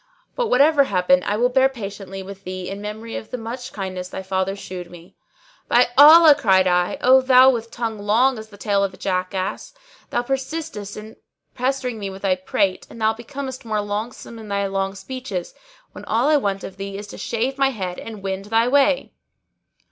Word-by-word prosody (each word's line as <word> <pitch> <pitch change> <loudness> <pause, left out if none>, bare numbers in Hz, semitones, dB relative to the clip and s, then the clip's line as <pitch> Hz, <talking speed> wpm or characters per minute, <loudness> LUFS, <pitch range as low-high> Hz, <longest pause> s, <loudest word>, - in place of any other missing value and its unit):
But - - 0
whatever 280 - +4
happen 180 -4 +3
I 205 - 0
will 245 +2 +3
bear 265 +1 +4
patiently 195 -5 -7
with 195 0 -10
thee 185 -1 -6
in 200 +1 -6
memory 220 +2 -6
of 220 - -9
the 250 - -4
much 245 +2 -7
kindness 185 -2 -5
thy 190 - -6
father 190 +1 -1
shewed 180 -3 -8
me." 175 0 -15 0.5
"By 245 0 +4
Allah," 310 +2 +9
cried 190 -8 +3
I, 180 +8 +1
"O 260 +1 +6
thou 260 0 +6
with 230 -2 -4
tongue 225 -2 -4
long 225 +5 +2
as 220 0 -10
the 205 - -14
tail 200 -1 +1
of 195 -1 -2
a - - -19
jackass, 185 - -3 0.3
thou 240 - -1
persistest 265 -5 -4
in 215 +1 -10 0.4
pestering 255 -2 -2
me 200 -1 -4
with 195 +1 -10
thy 195 -2 +3
prate 185 +1 -1
and 230 - -12
thou 220 0 +2
becomest 260 +3 -7
more 220 -2 -2
longsome 210 +3 -5
in 220 - -10
thy 200 0 -1
long 195 0 -2
speeches, 195 -3 -6 0.4
when - - -11
all 235 +6 +1
I 305 - +5
want 200 -6 -2
of 190 - -8
thee 195 0 -6
is 205 - -7
to - - -10
shave 255 +4 -2
my 270 0 +4
head 185 -8 -5
and 215 -3 -9
wend 195 0 -3
thy 225 +2 +2
way!" 280 +1 +2
215 Hz, 200 wpm, -21 LUFS, 195-255 Hz, 0.5 s, Allah